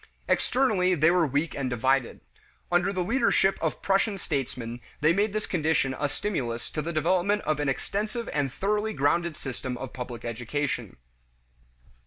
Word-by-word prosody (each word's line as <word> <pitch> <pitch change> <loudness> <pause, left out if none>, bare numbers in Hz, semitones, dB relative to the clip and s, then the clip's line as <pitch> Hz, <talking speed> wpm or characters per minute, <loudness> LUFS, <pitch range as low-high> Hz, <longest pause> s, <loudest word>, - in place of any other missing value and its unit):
Externally 200 -9 +2
they 160 +1 +5
were 175 -3 +3
weak 145 +4 0
and 135 -2 -2
divided. 130 +1 +1 0.5
Under 175 +2 +3
the 185 -2 -1
leadership 230 -2 +2
of 160 - -2
Prussian 195 +1 +2
statesmen 125 -7 -3 0.2
they 155 +2 +4
made 205 +3 +2
this 215 +1 -2
condition 155 -6 +1
a 145 - +1
stimulus 130 - -3
to 155 - -2
the 170 - -3
development 185 +6 +2
of 155 -1 0
an 145 -1 +1
extensive 215 - -2
and 145 -3 0
thoroughly 210 +6 0
grounded 170 +1 +1
system 130 -1 -5
of 135 0 -7
public 125 -2 -6
education. 125 +5 -3
155 Hz, 155 wpm, -27 LUFS, 135-195 Hz, 0.5 s, they